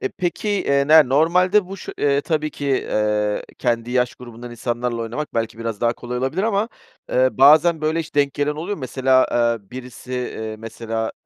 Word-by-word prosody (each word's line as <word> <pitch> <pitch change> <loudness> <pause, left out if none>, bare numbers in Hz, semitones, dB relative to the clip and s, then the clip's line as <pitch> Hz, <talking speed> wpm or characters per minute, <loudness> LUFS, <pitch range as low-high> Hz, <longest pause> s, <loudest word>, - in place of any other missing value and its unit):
E, 130 - -1
peki, 185 +4 -3
eee, 140 -8 +1
ne 155 -4 +7
normalde 180 +7 +3
bu 195 +1 -7
şu - - -8
eee 140 0 +2
tabii 155 -1 -1
ki, 145 - -6
eee, 105 -5 0 0.2
kendi 120 -1 -1
yaş 125 -1 +1
grubundan 120 -1 -10
insanlarla 120 0 -3
oynamak 120 +6 -5
belki 115 0 -2
biraz 115 -3 -4
daha 120 0 +2
kolay 125 +1 -6
olabilir 135 +9 -1
ama, 215 0 0 0.4
eee, 130 0 +3
bazen, 155 +4 +5
böyle, 155 +2 0
hiç 160 0 -9
denk 140 -1 +2
gelen 145 +1 0
oluyor 185 +6 -4
mu? - - -11
Mesela, 130 0 +2
eee, 115 -4 0
birisi, 125 0 -9
eee, 110 -3 -4
mesela, 115 0 -4
130 Hz, 185 wpm, -21 LUFS, 115-155 Hz, 0.4 s, ne